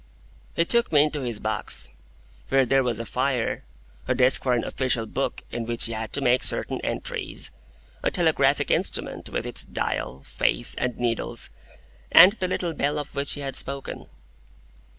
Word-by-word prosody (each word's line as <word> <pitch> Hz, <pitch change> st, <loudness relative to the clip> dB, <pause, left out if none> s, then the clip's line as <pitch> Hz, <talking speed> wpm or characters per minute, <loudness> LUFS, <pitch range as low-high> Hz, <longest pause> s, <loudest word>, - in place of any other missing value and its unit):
He 170 Hz, -, +3 dB
took 235 Hz, +2 st, +3 dB
me 145 Hz, -2 st, +6 dB
into 150 Hz, -1 st, -2 dB
his 120 Hz, -4 st, -2 dB
box, 110 Hz, 0 st, -2 dB, 0.6 s
where 135 Hz, -1 st, +4 dB
there 135 Hz, +2 st, +3 dB
was 120 Hz, -3 st, -1 dB
a 115 Hz, -, -5 dB
fire, -, -, -1 dB, 0.4 s
a 130 Hz, -, +1 dB
desk 130 Hz, +1 st, +4 dB
for 130 Hz, -, +1 dB
an 120 Hz, -, +1 dB
official 125 Hz, -3 st, -1 dB
book -, -, -3 dB
in 120 Hz, -1 st, -3 dB
which 115 Hz, 0 st, +2 dB
he 115 Hz, -, -2 dB
had 110 Hz, -1 st, -5 dB
to 140 Hz, -, +1 dB
make 125 Hz, -1 st, +3 dB
certain -, -, 0 dB
entries, -, -, -3 dB, 0.5 s
a -, -, +1 dB
telegraphic -, -, +2 dB
instrument -, -, 0 dB
with -, -, -3 dB
its -, -, -4 dB
dial, 70 Hz, +1 st, -3 dB
face, -, -, +1 dB
and 125 Hz, -1 st, -2 dB
needles, 120 Hz, -2 st, -1 dB, 0.6 s
and 180 Hz, +3 st, +10 dB
the 190 Hz, -4 st, -2 dB
little 175 Hz, -2 st, -2 dB
bell 145 Hz, 0 st, -1 dB
of 145 Hz, 0 st, -5 dB
which 140 Hz, 0 st, 0 dB
he 145 Hz, -, -5 dB
had 135 Hz, -1 st, -4 dB
spoken. 140 Hz, 0 st, -4 dB
130 Hz, 170 wpm, -25 LUFS, 115-145 Hz, 0.6 s, and